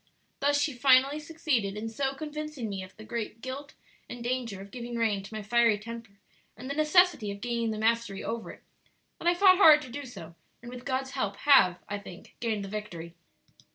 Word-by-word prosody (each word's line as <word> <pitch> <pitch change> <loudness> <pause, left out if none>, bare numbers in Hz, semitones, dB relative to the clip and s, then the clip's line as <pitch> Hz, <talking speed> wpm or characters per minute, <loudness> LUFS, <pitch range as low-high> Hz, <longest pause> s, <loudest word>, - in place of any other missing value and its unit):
Thus 285 +1 +2
she 290 0 0
finally 265 +3 +4
succeeded 290 -10 -1
in 220 +2 -4
so 270 +4 -2
convincing 300 -3 -5
me 195 -1 -4
of 185 +2 -11
the 220 - -10
great 225 0 -5
guilt 270 +4 -7 0.3
and 240 -1 -7
danger 240 -5 -2
of 195 +1 -11
giving 240 0 -6
rein 220 -4 +1
to 200 - -12
my 215 - -5
fiery 230 0 +3
temper 225 -1 -9 0.4
and 250 +4 -8
the 280 - -2
necessity 310 - +3
of 200 0 -6
gaining 235 0 -1
the 215 - -3
mastery 225 -2 0
over 230 0 -4
it, - - -12 0.6
that - - -3
I 350 - +4
fought 370 0 +6
hard 315 -6 +8
to 260 - -10
do 285 +2 -6
so, 165 -9 -10 0.3
and 240 +1 -10
with 250 0 -9
God's 265 0 -2
help 205 -8 -2
have, 195 -12 +6
I 205 0 -4
think, 185 -3 -13
gained 220 -4 -2
the - - -7
victory. 180 -5 -6
235 Hz, 205 wpm, -28 LUFS, 210-275 Hz, 0.6 s, hard